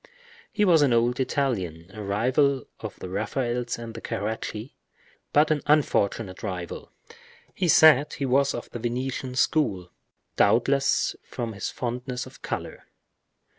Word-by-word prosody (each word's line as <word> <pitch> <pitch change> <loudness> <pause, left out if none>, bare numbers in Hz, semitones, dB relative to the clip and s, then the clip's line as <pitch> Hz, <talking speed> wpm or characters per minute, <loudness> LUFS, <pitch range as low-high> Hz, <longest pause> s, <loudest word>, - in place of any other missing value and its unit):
He 210 - +2
was 170 -5 +5
an 140 -4 +4
old 120 +2 +2
Italian, 95 - -2
a 110 - -7
rival 130 +7 +1
of - - -7
the - - -7
Raphaels 120 +5 -2
and 115 -1 -7
the 115 - -8
Caracci, 110 +3 -4 0.6
but 150 +2 +4
an 150 -2 +1
unfortunate 115 -9 +1
rival. 90 -4 -5 0.6
He 185 - -1
said 150 -2 +6
he 140 - -3
was 135 +2 +2
of - - -6
the 120 - -6
Venetian 125 +2 -3
school, 100 - +1 0.5
doubtless 135 +6 +3
from 120 -3 -5
his 100 - -4
fondness 125 +1 -4
for - - -13
color. - - -5
125 Hz, 135 wpm, -26 LUFS, 105-140 Hz, 0.6 s, said